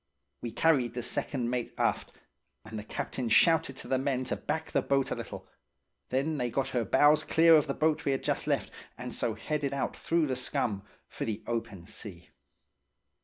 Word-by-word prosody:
We 120 - -3
carried 125 -4 +2
the 120 - -3
second 125 -3 -1
mate 125 -2 -2
aft, - - 0 0.5
and 110 0 -6
the - - -7
captain 120 +2 -3
shouted 165 +8 +4
to - - -7
the 130 - +1
men 130 -1 0
to 130 - -2
back 160 +1 -3
the 140 - +2
boat 135 0 +1
a - - 0
little; - - -7 0.6
then 140 +4 0
they 125 -1 0
got 135 +3 -1
her 120 -2 0
bows 150 +8 +5
clear 165 +1 +6
of 155 -1 +4
the 140 - -2
boat 155 0 +1
we 140 - +1
had 135 - -2
just - - -1
left, - - 0 0.3
and 125 0 -6
so 110 - -1
headed 140 +3 -2
out 140 - -2
through 165 -1 +1
the 130 -3 -1
scum 115 -5 -1 0.3
for - - -5
the 110 -1 -4
open 105 -6 -4
sea. 90 -3 -9
130 Hz, 195 wpm, -30 LUFS, 115-150 Hz, 0.6 s, clear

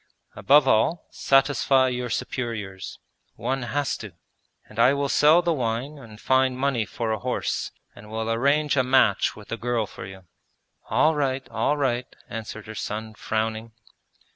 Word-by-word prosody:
Above 145 0 +5
all, 155 +9 +2
satisfy 135 -1 +3
your 125 -1 -3
superiors: 105 -7 -4 0.4
one 135 +1 -2
has 140 +4 -1
to! 105 -5 -9 0.5
And 110 - -10
I 125 +4 +6
will 140 0 -1
sell 155 +6 +5
the 170 - +1
wine 130 +2 -3
and 110 -5 -13
find 130 0 +2
money 130 -5 0
for 115 0 -3
a 110 - -1
horse - - -2 0.3
and 105 +1 -13
will 110 0 -3
arrange 140 +6 +2
a 130 - +4
match 125 -5 +3
with 105 -1 -13
the 115 - -3
girl 120 -1 -1
for 95 - -9
you.' 95 0 -11 0.7
'All 135 +8 +3
right, 135 -3 -1
all 150 - 0
right!' 125 -3 -1
answered 110 -1 -7
her 110 - -8
son, 110 +1 -5
frowning. 110 +1 -3
125 Hz, 160 wpm, -25 LUFS, 110-135 Hz, 0.7 s, I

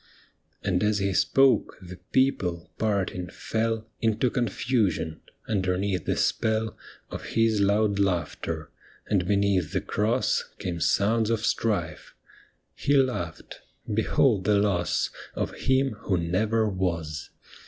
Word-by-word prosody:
And 90 -3 +1
as 105 0 +2
he 100 -1 0
spoke, 135 +8 +3
the 90 -2 -10
people, 90 -11 +1
parting, 95 -4 -1
fell 110 +4 -2
Into 115 +2 +1
confusion, 105 - 0 0.3
underneath 95 -3 0
the - - 0
spell 110 0 0 0.4
Of - - -6
his 115 -2 +3
loud 100 0 +2
laughter, 85 -4 -1 0.3
and 95 -4 0
beneath 100 -4 +1
the - - +2
Cross 115 +4 0
Came 85 -2 -4
sounds 110 +6 +2
of 110 -1 0
strife; 85 -11 -1 0.6
he 145 0 +2
laughed, 90 - -1 0.2
" - - -7
Behold 110 -2 +2
the 105 0 +4
loss 100 -4 +1 0.2
Of - - -2
Him 130 +1 +1
who 95 - 0
never 105 +7 +1
was." 85 -6 -2
100 Hz, 120 wpm, -26 LUFS, 90-110 Hz, 0.6 s, the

